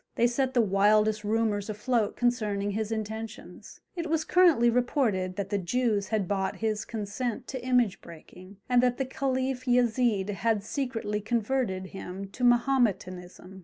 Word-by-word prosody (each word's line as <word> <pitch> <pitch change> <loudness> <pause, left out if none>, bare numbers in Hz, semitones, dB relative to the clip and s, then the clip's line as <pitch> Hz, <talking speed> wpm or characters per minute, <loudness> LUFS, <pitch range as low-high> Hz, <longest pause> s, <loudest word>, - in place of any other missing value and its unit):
They 235 - +3
set 260 +2 0
the 240 - +5
wildest 210 +2 +3
rumours 215 -1 0
afloat 215 +1 0
concerning 210 -5 0
his 215 +1 -3
intentions; 220 0 -6
it 335 -2 -4
was 320 -1 0
currently 335 -10 +5
reported 235 -6 +1
that 200 -1 -4
the 205 - +1
Jews 210 +1 0
had 215 -4 -1
bought 195 -1 -1
his 215 -1 -2
consent 220 +2 -4
to 260 -2 -5
image 250 -5 +1
breaking, 185 +4 -13
and 245 -1 +4
that 250 -1 +1
the 270 - -1
Caliph 260 -1 -2
Yezid 240 -4 +2
had 215 0 0
secretly 225 -4 -3
converted 220 -4 -1
him 195 0 -7
to 250 +6 -7
Mahometanism. 195 -7 0
220 Hz, 150 wpm, -28 LUFS, 200-250 Hz, -, the